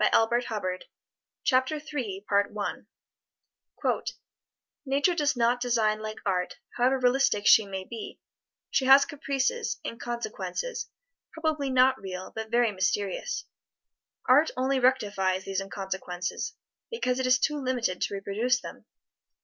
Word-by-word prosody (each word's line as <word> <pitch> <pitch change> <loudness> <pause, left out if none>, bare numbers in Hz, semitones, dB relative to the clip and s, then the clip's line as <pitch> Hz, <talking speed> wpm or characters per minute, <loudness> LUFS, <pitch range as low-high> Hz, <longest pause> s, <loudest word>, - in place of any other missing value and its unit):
[Illustration: 230 +3 +3
FREDERIC 185 -4 -3 0.6
CHOPIN] 260 +4 +2 0.5
FREDERIC 205 0 0 1.0
CHOPIN - - 0 0.7
Nature 280 +6 +2
does 295 -5 +1
not 240 +1 +2
design 225 -3 +2
like 215 0 -5
art, 180 -2 0 0.2
however 255 +2 +3
realistic 255 -4 +2
she 215 -2 +7
may 190 -1 -4
be. 225 +3 -8 0.5
She 275 -1 +2
has 270 +1 +8
caprices, 285 - -1
inconsequences, 240 - -4 0.4
probably 310 -3 -1
not 260 0 +4
real, 185 -1 -6
but 220 0 -5
very 240 -1 +3
mysterious. 195 - -1 0.8
Art 280 +5 +5
only 260 +1 +1
rectifies 205 -7 +1
these 195 0 -2
inconsequences, 190 +1 -4 0.3
because 255 - -1
it 260 - 0
is 255 0 +5
too 300 +4 0
limited 245 -8 -1
to - - -1
reproduce 220 +6 0
them. - - -10
240 Hz, 120 wpm, -28 LUFS, 200-265 Hz, 1.0 s, has